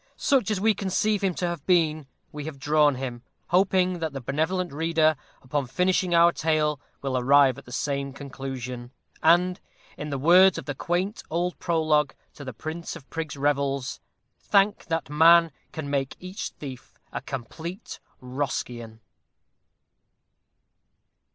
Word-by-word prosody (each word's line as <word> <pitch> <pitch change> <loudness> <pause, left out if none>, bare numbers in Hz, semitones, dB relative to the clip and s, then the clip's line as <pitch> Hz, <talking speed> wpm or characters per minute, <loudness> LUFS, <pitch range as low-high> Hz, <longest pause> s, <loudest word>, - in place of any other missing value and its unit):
Such 270 -5 +2
as 210 -3 0
we 220 +2 +3
conceive 200 +1 0
him 185 -3 +1
to 180 - -2
have 170 -4 -4
been, 155 -5 +2 0.2
we 150 -1 -7
have 155 -3 -6
drawn 150 0 +3
him 125 -2 -5 0.3
hoping 185 0 +2
that 160 -3 -3
the 135 - -4
benevolent 160 +7 -1
reader, 160 0 +2 0.3
upon 140 0 -2
finishing 180 +4 +1
our 170 +1 +6
Tale, 155 -3 0 0.2
will 135 -1 -1
arrive 135 0 +4
at - - -16
the 120 - -13
same 140 +1 -2
conclusion; 130 -3 -7 0.3
and, 180 +3 +4 0.4
in 150 - -5
the 140 - -2
words 180 +6 +6
of - - -6
the 145 - -3
quaint 180 - -2
old 175 +2 -2
Prologue 155 -4 +1 0.2
to 145 - -10
the 130 - -5
Prince 160 +9 -6
of 145 -5 -12
Prigs' 160 -3 -4
Revels, 140 -1 0 0.4
Thank 200 0 +2
that 165 -1 -2
man, 165 +3 +6 0.2
Can 155 -2 -5
make 140 -2 -1
each 185 +2 -5
thief 130 -4 -10
a - - -4
complete 160 - -7 0.2
Roscian! 125 -3 -4
155 Hz, 145 wpm, -26 LUFS, 135-175 Hz, 0.4 s, our